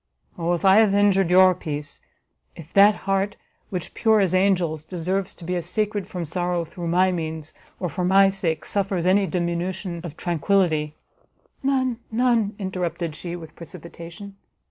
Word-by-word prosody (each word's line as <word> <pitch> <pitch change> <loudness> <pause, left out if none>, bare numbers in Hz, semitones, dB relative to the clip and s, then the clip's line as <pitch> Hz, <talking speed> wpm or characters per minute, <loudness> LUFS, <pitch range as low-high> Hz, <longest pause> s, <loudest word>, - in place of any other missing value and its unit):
Oh 170 +1 -1
if 175 - -2
I 190 +1 +7
have 215 -3 +5
injured 195 -3 +3
your 185 +1 +6
peace, 150 -3 -5 0.5
if 165 0 -12
that 205 +1 +7
heart, 195 +1 0 0.3
which, 180 -4 -5
pure 220 -2 +3
as 190 -3 +2
angels, 180 -5 +2
deserves 185 +3 -3
to - - -14
be 180 +2 -2
as 175 -3 -3
sacred 210 -2 -1
from 175 -2 -5
sorrow, 175 +1 -1
through 170 +1 -7
my 185 +2 +3
means, 160 -3 -4 0.3
or 180 - -1
for 175 +3 -3
my 195 +2 +5
sake, 175 -5 -2
suffers 195 -3 -1
any 195 +2 +3
diminution 175 0 -2
of 165 -3 -8
tranquility 165 -3 +1 0.3
" - - -46 0.2
"None, 260 -3 0
none!" 230 -3 +2
interrupted 175 -4 -3
she, 175 +2 -6
with 160 -3 -10
precipitation. 170 +3 -10
180 Hz, 165 wpm, -23 LUFS, 170-195 Hz, 0.5 s, I